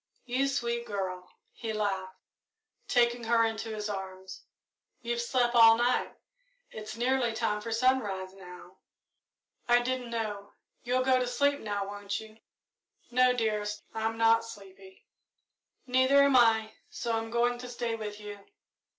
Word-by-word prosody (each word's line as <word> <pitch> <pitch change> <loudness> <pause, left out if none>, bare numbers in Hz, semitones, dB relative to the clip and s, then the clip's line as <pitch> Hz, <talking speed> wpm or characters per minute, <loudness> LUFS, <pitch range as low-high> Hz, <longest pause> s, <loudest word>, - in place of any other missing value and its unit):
"You 255 +2 0
sweet 235 -3 -2
girl," 185 -3 -4 0.2
he 225 -2 -5
laughed, 195 -3 -2 0.7
taking 240 -1 +2
her 230 0 +3
into 225 0 -3
his 215 -1 -4
arms; 190 -2 -7 0.6
"you've 235 0 -2
slept 240 0 +1
all 225 -1 +8
night 245 +1 0 0.6
it's 215 +1 -8
nearly 245 -1 +1
time 210 -2 -1
for 230 +2 -6
sunrise, 225 -6 0
now." 180 -1 -13 0.9
"I 240 0 +5
didn't 250 0 -3
know. 210 -3 -4 0.3
You'll 250 +1 0
go 260 0 +3
to 250 - -1
sleep 285 +4 +1
now, 205 -2 -3
won't 200 0 -4
you?" 220 0 -13 0.7
"No, 250 +1 +4
dearest 210 -3 -2
I'm 225 0 -2
not 225 0 +4
sleepy." 195 -3 -13 0.8
"Neither 260 +2 +4
am 280 -1 +3
I, 220 -3 +4 0.2
so 235 -1 -3
I'm 225 0 -3
going 240 +1 +1
to 250 0 -8
stay 240 -1 -3
with 210 -2 -6
you." 205 -1 -8
225 Hz, 140 wpm, -29 LUFS, 205-245 Hz, 0.9 s, all